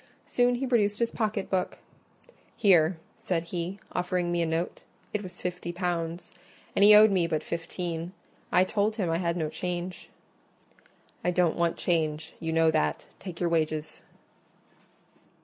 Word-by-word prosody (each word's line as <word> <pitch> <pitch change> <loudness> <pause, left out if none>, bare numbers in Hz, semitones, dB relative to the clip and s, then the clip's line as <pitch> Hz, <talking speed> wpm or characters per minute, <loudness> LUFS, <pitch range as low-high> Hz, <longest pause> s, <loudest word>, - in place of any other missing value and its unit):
Soon 245 0 +2
he 260 +3 -2
produced 210 -5 +2
his 235 -1 0
pocket 215 -3 -1
book: 185 -1 -1 0.8
"Here," 175 -4 +4 0.2
said 170 -3 -1
he, 175 +2 -4
offering 180 -1 -1
me 175 0 +1
a 165 - +1
note; 165 +2 -2 0.3
it 210 - -1
was 185 -3 -9
fifty 180 -1 -3
pounds, 175 -1 -3 0.4
and - - +2
he 210 +1 +9
owed 215 0 +8
me 180 -3 +2
but 155 -2 -1
fifteen. 170 0 -4 0.4
I 180 - +5
told 205 +3 0
him 185 -7 -1
I 165 - +1
had 170 -1 0
no 160 -2 0
change. 180 +2 -4 1.1
"I - - +2
don't 180 -2 +2
want 170 -1 0
change; 160 -3 -1
you 165 -1 -3
know 165 0 +4
that. 155 -1 0
Take 180 -3 -8
your 175 - +1
wages." 155 -2 -1
175 Hz, 155 wpm, -28 LUFS, 165-190 Hz, 1.1 s, he